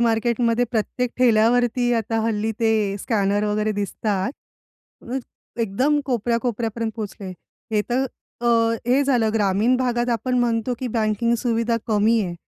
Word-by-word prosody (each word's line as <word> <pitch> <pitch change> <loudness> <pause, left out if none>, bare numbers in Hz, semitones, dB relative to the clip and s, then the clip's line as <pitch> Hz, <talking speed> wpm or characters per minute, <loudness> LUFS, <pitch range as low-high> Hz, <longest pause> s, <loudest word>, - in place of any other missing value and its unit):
मार्केटमध्ये 235 +1 +2
प्रत्येक 240 +2 -1
ठेल्यावरती 245 +1 +3
आता 225 0 -1
हल्ली 220 -1 0
ते 225 -1 +3 0.3
स्कॅनर 205 -1 0
वगैरे 210 +1 0
दिसतात. 200 0 -2 0.8
अ, 265 - -1 0.4
एकदम 255 +8 +1
कोपऱ्या-कोपऱ्यापर्यंत 230 -2 -1
पोहचले. 205 -2 -6 0.4
हे 210 -1 +2
तर 260 +2 +1 0.3
अ, 240 - -2 0.4
हे 260 +3 +3
झालं 240 -5 +2
ग्रामीण 210 +4 +2
भागात 245 -1 0
आपण 250 +2 0
म्हणतो 235 0 0
की 260 - -3
बँकिंग 225 +1 +1
सुविधा 230 -1 0
कमी 220 +1 +3
आहे. 175 -3 -4
230 Hz, 130 wpm, -22 LUFS, 215-245 Hz, 0.8 s, ठेल्यावरती